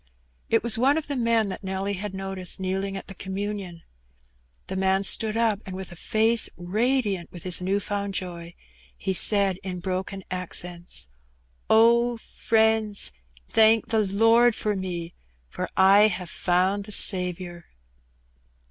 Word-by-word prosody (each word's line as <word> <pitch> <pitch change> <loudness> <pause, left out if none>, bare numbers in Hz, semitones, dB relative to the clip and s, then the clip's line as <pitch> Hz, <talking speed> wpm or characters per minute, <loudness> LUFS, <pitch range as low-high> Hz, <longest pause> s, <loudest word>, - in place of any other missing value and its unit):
It 225 - +2
was 230 -1 0
one 275 +5 +3
of 320 - -2
the 285 - -4
men 230 -4 +1
that 190 - -7
Nelly 190 +1 -3
had 195 0 -5
noticed 190 -1 -3
kneeling 195 +1 -3
at - - -8
the - - -9
communion. 190 -2 -5 0.8
The - - -6
man 190 +1 +1
stood 220 +2 +3
up, 225 -3 +1
and 185 - -8
with 190 -1 -8
a - - -10
face 220 +5 +1
radiant 205 0 -1
with 175 - -10
his 180 -1 -1
new 195 +2 0
found 200 -1 -4
joy, 170 -2 -6 0.4
he 190 - -2
said 195 -1 +3
in 185 -1 -5
broken 190 +2 -4
accents 175 - -4 0.3
— 60 0 -40
'^Oh, 235 +1 +4
friends, 220 -2 +1 0.4
thank 225 +1 +4
the 225 -1 +2
Lord 225 +4 +3
for 210 -1 -2
me, 175 -3 -5 0.4
for - - -5
I 195 +3 +6
have 180 -4 -5
found 185 +3 0
the 210 - -10
Saviour 180 -3 +1
195 Hz, 150 wpm, -25 LUFS, 185-220 Hz, 0.8 s, I